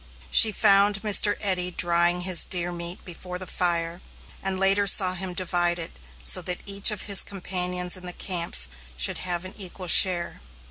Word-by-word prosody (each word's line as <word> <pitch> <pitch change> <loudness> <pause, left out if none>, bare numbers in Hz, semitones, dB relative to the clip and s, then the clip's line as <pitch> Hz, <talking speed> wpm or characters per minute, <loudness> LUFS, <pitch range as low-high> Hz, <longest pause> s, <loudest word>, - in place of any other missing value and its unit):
She 220 - +6
found 200 0 +1
Mr. 210 -1 +2
Eddy 185 -3 -2
drying 175 0 -1
his 180 -1 +5
deer 175 -1 -4
meat 170 +1 -8
before 180 +1 -9
the 185 - -9
fire, 170 -1 -3 0.4
and 190 0 -3
later 195 +1 +1
saw 185 -2 +4
him 185 0 -5
divide 175 -1 -1
it 165 - -8 0.2
so - - +6
that 180 -1 -5
each 200 0 +3
of 210 -3 -3
his 200 -2 +3
companions 180 -2 -3
in 180 -1 -9
the 180 - -6
camps 170 - 0 0.3
should 65 - -1
have 175 -1 -5
an 185 - -8
equal 185 -2 -9
share. 175 - +4
180 Hz, 175 wpm, -23 LUFS, 175-195 Hz, 0.4 s, She